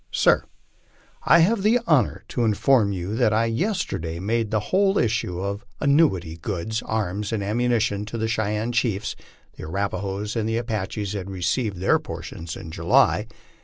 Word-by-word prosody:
SIR: - - +3 0.8
I 170 - +7
have 200 +5 +3
the 220 +5 +4
honor 145 - +2
to 120 - -1
inform 110 0 +3
you 95 +2 -3
that 120 -4 +3
I 110 +2 +3
yesterday 115 - -2
made 110 +3 0
the 110 - +1
whole 195 +1 +4
issue 110 -6 0
of 100 +3 -3 0.2
annuity 140 - +2
goods, 105 +5 -3
amis, 105 -1 -2
and 110 -3 -1
ammunition 110 -1 0
to 110 +2 -6
the 110 0 -1
Cheyenne 110 +1 -1
chiefs 115 -4 -1 0.4
[the - - -7
Arapahoes 100 +4 -3
and 110 -1 -1
Apaches 110 -3 -2
had 100 -2 -5
received 95 +3 -1
their 95 - +3
por - - -7
tion 85 - -8
in 80 -4 -8
July. - - +3
110 Hz, 160 wpm, -24 LUFS, 100-120 Hz, 0.8 s, I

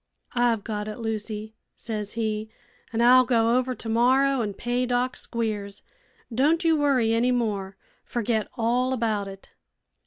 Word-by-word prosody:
'I've 240 -3 +2
got 210 -1 -4
it, 215 - -5
Lucy,' 220 -1 -4 0.2
says 210 -3 -5
he, 220 -1 -2 0.4
'an' 230 0 0
I'll 255 +2 +7
go 235 -1 +2
over 255 0 -2
tomorrow 255 +4 +2
an' 205 -3 -3
pay 245 +3 -1
Doc 250 +1 0
Squiers. 210 -4 -4 0.5
Don' 285 +8 +3
you 325 -1 +4
worry 270 -7 +2
any 240 +2 +2
more. 205 -6 -1 0.3
Forget 225 -2 -1
all 250 +3 +1
about 220 -5 -1
it.' 195 0 -11
230 Hz, 145 wpm, -25 LUFS, 215-250 Hz, 0.5 s, I'll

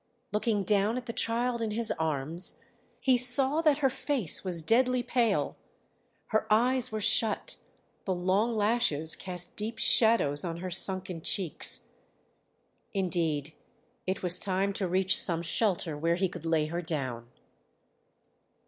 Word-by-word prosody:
Looking 210 -1 -1
down 205 +4 +1
at 250 - -7
the 230 - -6
child 235 +1 -1
in 225 - -2
his 225 +1 -1
arms, 160 +2 -2 0.4
he 255 -2 +2
saw 265 +5 +4
that 305 -4 +2
her - - +4
face 260 - +2
was 175 -4 +2
deadly 250 +6 +1
pale, 240 -4 -1 0.7
her 220 - -1
eyes 245 +3 +1
were 215 - -4
shut, 225 - +2 0.5
the 190 - -2
long 195 +6 -1
lashes 205 -8 +1
cast 180 -2 -6
deep 220 +2 -5
shadows 220 -11 +3
on 170 -2 -5
her 180 +1 -7
sunken 185 -1 0
cheeks. 180 -1 +1 1.1
Indeed 165 -6 -2 0.5
it 190 +1 -3
was 180 0 +7
time 195 +1 -2
to 190 -1 -2
reach 185 +2 +1
some 170 -2 +2
shelter 175 -3 -1
where 165 +3 -1
he 190 +2 -1
could 165 - -11
lay 160 -2 0
her 170 +3 -5
down. 130 -8 -5
195 Hz, 140 wpm, -28 LUFS, 170-230 Hz, 1.1 s, was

